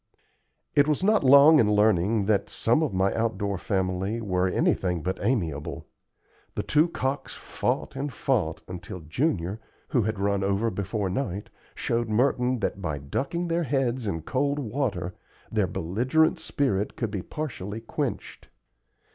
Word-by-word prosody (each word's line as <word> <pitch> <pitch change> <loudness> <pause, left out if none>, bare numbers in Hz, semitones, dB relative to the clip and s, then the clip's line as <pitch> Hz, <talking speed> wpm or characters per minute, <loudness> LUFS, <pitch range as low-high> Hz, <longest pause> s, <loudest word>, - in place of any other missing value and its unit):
I 145 - +7
was 150 +4 +1
not 215 -1 +4
long 140 +4 +8
in 105 -2 +4
learning 105 0 +3
that 105 -1 +1
some 120 +7 +1
of 155 - 0
my 95 +1 +1
outdoor 100 -4 -1
family 95 +3 -1
were 95 -4 0
anything 90 -2 +1
but 95 +1 -2
amiable. 85 - -1 0.7
The - - -1
two 155 +3 +3
cocks 135 -4 -3
fought - - -2
and 140 +1 -3
fought 105 -13 -1
until 90 0 -7
Junior, 95 - -1 0.3
who 125 - +2
had 110 0 -1
run 100 0 0
over 100 +4 +1
before 95 0 -2
night, 100 -3 -3 0.2
showed 115 -1 -1
Merton 125 +1 +2
that 100 - -2
by 80 -5 -2
ducking 135 - -2
their 170 +1 +1
heads 130 -5 0
in 80 -5 -2
cold 140 - 0
water 110 - -2 0.4
their - - +1
belligerent 125 - +1
spirit 135 -10 -1
could 115 -4 -2
be 100 -3 -3
partially 110 - -5
quenched. 115 - -4
110 Hz, 145 wpm, -26 LUFS, 95-135 Hz, 0.7 s, long